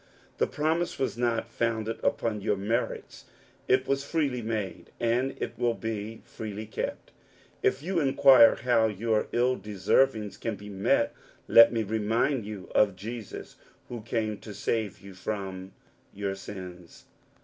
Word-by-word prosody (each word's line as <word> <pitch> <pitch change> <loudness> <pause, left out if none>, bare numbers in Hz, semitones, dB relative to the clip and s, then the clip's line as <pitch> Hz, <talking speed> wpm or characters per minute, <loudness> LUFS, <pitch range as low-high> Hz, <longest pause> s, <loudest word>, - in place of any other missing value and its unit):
The - - +3
promise 160 +3 -1
was 130 - -1
^^. 120 -2 0
founded 115 -1 -2
upon 105 -3 0
your 100 - +1
merits; 110 +5 -3 0.4
it 130 +1 +3
was 140 0 0
freely 140 -5 -1
made, 105 -6 -4
a^^ 120 +3 +1
it - - -3
will 120 -1 +2
be 110 0 -5
as - - -25
freely 110 -1 -5
kept. 110 - -5 0.5
If 140 - +1
you 180 +1 0
inquire 135 -4 +7
how 115 -3 +2
ya^. 110 +1 0
ill 125 +2 +2
deservings 105 +2 +1
can 115 -2 -2
be 105 +1 -10
met, 100 -1 +1 0.3
let 115 - +8
me 115 -2 0
remind 110 +3 0
you 105 -3 -8
^ 100 -3 +4
Jesus 110 +3 -7 0.3
who 120 -2 -6
came 110 -1 -2
to 105 -2 -9
save 105 0 -2
you 100 0 -11
from 95 -1 -5 0.4
your 100 -1 -3
sins. 90 -3 -10
110 Hz, 150 wpm, -28 LUFS, 100-120 Hz, 0.5 s, let